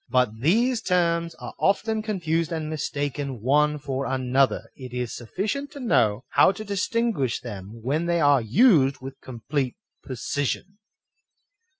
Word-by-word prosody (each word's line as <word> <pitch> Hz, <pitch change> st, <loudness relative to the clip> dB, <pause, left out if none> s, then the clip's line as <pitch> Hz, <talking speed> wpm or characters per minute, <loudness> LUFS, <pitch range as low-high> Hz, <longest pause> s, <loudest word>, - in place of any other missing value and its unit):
But 125 Hz, -4 st, +1 dB
these 225 Hz, -, +2 dB
terms 170 Hz, -3 st, +1 dB
are -, -, -8 dB
often 220 Hz, +3 st, +1 dB
confused 170 Hz, -7 st, -1 dB
and 160 Hz, -2 st, -2 dB
are -, -, -5 dB
mistaken 145 Hz, -3 st, -3 dB
one 150 Hz, +6 st, +2 dB
for 135 Hz, -1 st, -3 dB
another; 130 Hz, +1 st, +1 dB
it 125 Hz, -2 st, -10 dB
is 125 Hz, -2 st, -3 dB
sufficient 210 Hz, -, -3 dB
to 285 Hz, -, -8 dB
know 115 Hz, -, +2 dB
how -, -, +5 dB
to 215 Hz, +3 st, -8 dB
distinguish 200 Hz, -, 0 dB
them 110 Hz, 0 st, -9 dB
when 150 Hz, +7 st, 0 dB
they 170 Hz, 0 st, +2 dB
are 145 Hz, -4 st, +4 dB
used 140 Hz, -, +4 dB
with 135 Hz, +1 st, -9 dB
complete 130 Hz, +1 st, -3 dB, 0.3 s
precision. 145 Hz, -, -3 dB
145 Hz, 140 wpm, -25 LUFS, 130-185 Hz, 0.3 s, how